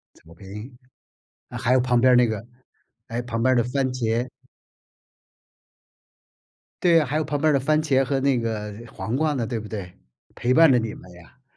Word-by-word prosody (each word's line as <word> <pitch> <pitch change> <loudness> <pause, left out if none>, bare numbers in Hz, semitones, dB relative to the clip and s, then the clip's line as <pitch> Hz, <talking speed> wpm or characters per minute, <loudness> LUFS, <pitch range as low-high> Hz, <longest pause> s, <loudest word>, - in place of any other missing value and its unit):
草 80 - -18
坪， 105 +7 -10 0.7
啊， - - -7
还 125 +2 +2
有 130 - +4
旁 125 -1 +2
边 130 +1 +5
儿 - - +6
那 125 -1 +5
个 110 -1 -4 0.6
还 115 - -7
有 - - -2
旁 115 -1 -3
边 130 +1 +3
的 120 - +4
番 130 +3 -1
茄。 120 0 -1 2.6
对 170 -2 +5
啊， 150 - 0
还 145 +4 -4
有 155 - +1
旁 145 0 -3
边 155 +2 +2
儿 - - +3
的 140 - +3
番 155 +3 +2
茄 135 -3 +2
和 135 +1 -1
那 135 -1 +2
个 110 -3 -3 0.2
黄 115 +3 -4
瓜 155 +1 +1
呢， 120 -3 -2
对 120 -2 -3
不 110 -1 -7
对？ 100 -5 -6 0.5
陪 125 +1 0
伴 165 +1 +6
着 125 - +5
你 110 -1 -4
们 90 - -13
呀。 105 +9 -18
125 Hz, 220 characters per minute, -23 LUFS, 115-135 Hz, 2.6 s, 儿